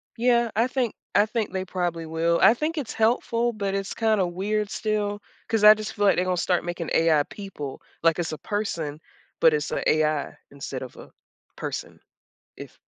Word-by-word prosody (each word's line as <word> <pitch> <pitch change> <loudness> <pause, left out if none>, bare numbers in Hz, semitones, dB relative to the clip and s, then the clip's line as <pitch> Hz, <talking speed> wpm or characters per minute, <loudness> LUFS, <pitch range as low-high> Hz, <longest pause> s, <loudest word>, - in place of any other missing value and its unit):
Yeah, 235 -1 +2
I 230 +3 +3
think 255 -4 -1 0.2
I 205 - +6
think 220 0 -2
they 190 -1 -3
probably 175 -3 -2
will. 165 +1 +1
I 225 - +8
think 310 +6 -3
it's 280 -7 -3
helpful, 230 +1 +1
but 200 -2 -2
it's 195 0 -2
kinda 215 -4 +2
weird 200 +4 -2
still, 210 -1 -2 0.3
'cause 225 -2 +1
I 210 - +11
just 215 0 -6
feel 205 -1 0
like 195 - +5
they're 180 - +1
going 185 0 0
to - - 0
start 180 -2 +1
making 175 -1 -4
AI 160 -3 +4
people 150 -8 -8 0.2
like 165 +1 +3
it's 165 -2 -2
a 155 - -4
person, 165 -9 -3 0.4
but 160 -1 +5
it's 150 -1 -1
a - - -1
AI 155 -1 +1
instead 140 -2 -6
of 130 - -10
a - - -13 0.4
person, - - -6 0.6
if - - -11
195 Hz, 195 wpm, -25 LUFS, 165-220 Hz, 0.6 s, I